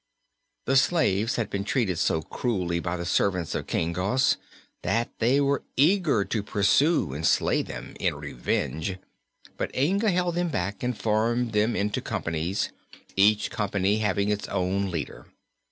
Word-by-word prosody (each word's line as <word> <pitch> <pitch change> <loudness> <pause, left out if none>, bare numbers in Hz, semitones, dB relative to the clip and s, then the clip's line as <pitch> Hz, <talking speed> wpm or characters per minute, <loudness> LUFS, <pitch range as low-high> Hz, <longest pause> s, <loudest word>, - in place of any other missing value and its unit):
The 135 +2 +3
slaves 115 - +2
had 110 -4 -2
been 100 0 -2
treated 100 - 0
so 80 - +1
cruelly 90 -5 -1
by 85 +1 -3
the 85 - -4
servants 90 -2 +1
of - - -3
King 85 +1 -1
Gos 100 +9 +2 0.5
that 115 +1 0
they 125 +5 +3
were 140 -1 +1 0.2
eager 150 - +3
to 110 - -1
pursue 105 - +2
and 75 +3 -5
slay - - +3
them, - - -8
in - - 0
revenge; 80 +8 -2 0.6
but - - -2
Inga 195 - +2
held 180 -1 +1
them 175 0 0
back 100 - -3
and 125 -2 -2
formed 115 +3 +1
them 110 +2 +2
into 105 +1 -1
companies, 85 +4 -2 0.4
each 105 +2 +3
company 100 0 0
having 105 -1 +1
its 105 0 -1
own 95 +2 -1
leader. 85 -4 -5
105 Hz, 155 wpm, -26 LUFS, 95-125 Hz, 0.6 s, The